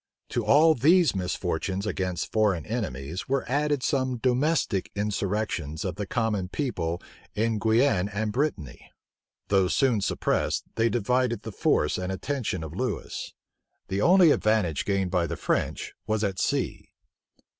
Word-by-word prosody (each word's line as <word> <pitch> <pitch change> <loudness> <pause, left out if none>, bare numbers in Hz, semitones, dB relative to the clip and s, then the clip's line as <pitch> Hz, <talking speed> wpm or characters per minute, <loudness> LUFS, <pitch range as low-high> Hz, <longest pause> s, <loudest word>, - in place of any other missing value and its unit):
To 120 - -1
all 150 +9 +6
these 160 - +4
misfortunes 95 +1 -2
against 95 -3 -2
foreign 105 -7 +1
enemies 85 - -4
were 135 0 0
added 145 0 0
some 130 -2 0
domestic 125 - +1
insurrections 100 -6 -2
of 90 - -1
the 100 +3 -5
common 105 -6 -1
people 90 - -2 0.4
in 110 0 0
Guienne 110 -3 +2
and 105 +2 -2
Brittany. 120 - -3 0.6
Though 95 -2 +3
soon 120 +1 +2
suppressed, - - 0
they 115 +1 +2
divided 120 0 0
the 110 - -6
force 75 -5 +1
and 90 +1 -3
attention 105 - -3
of 80 -1 -7
Lewis. 125 0 -4 0.5
The 95 +1 -1
only 180 - +6
advantage 105 - +1
gained 95 -3 0
by 90 -2 +1
the - - -4
French - - -2
was 110 0 0
at 95 -2 -1
sea. - - -1
105 Hz, 140 wpm, -26 LUFS, 95-125 Hz, 0.6 s, all